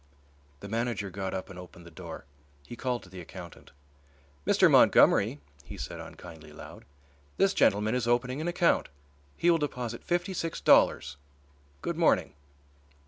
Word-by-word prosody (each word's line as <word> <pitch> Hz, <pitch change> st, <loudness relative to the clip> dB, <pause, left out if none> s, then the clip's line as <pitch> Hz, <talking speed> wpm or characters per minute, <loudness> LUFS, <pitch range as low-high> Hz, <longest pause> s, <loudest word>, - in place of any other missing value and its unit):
The 100 Hz, -, -8 dB
manager 115 Hz, -2 st, -2 dB
got 95 Hz, 0 st, -4 dB
up 95 Hz, -, -5 dB
and 90 Hz, -, -10 dB
opened 85 Hz, -1 st, -13 dB
the 85 Hz, -, -13 dB
door. 80 Hz, -, -9 dB, 0.4 s
He 120 Hz, -, -9 dB
called 125 Hz, -1 st, -3 dB
to 95 Hz, -, -15 dB
the 95 Hz, -1 st, -9 dB
accountant. 85 Hz, 0 st, -11 dB, 0.8 s
"Mr. -, -, +5 dB
Montgomery," 75 Hz, -, +5 dB, 0.2 s
he -, -, -10 dB
said -, -, -6 dB
unkindly 80 Hz, -3 st, -11 dB
loud, 75 Hz, -, -12 dB, 0.5 s
"this -, -, +3 dB
gentleman 105 Hz, +3 st, +2 dB
is 125 Hz, -2 st, -1 dB
opening 125 Hz, +4 st, 0 dB
an 160 Hz, -, -3 dB
account, 175 Hz, -1 st, +1 dB, 0.5 s
he 175 Hz, -, +3 dB
will 165 Hz, -, +2 dB
deposit 125 Hz, -6 st, -4 dB
fifty 175 Hz, +2 st, -1 dB
six 165 Hz, -2 st, -3 dB
dollars. -, -, +3 dB, 0.7 s
Good -, -, -3 dB
morning." 70 Hz, -, +2 dB
110 Hz, 150 wpm, -28 LUFS, 90-125 Hz, 0.8 s, Mr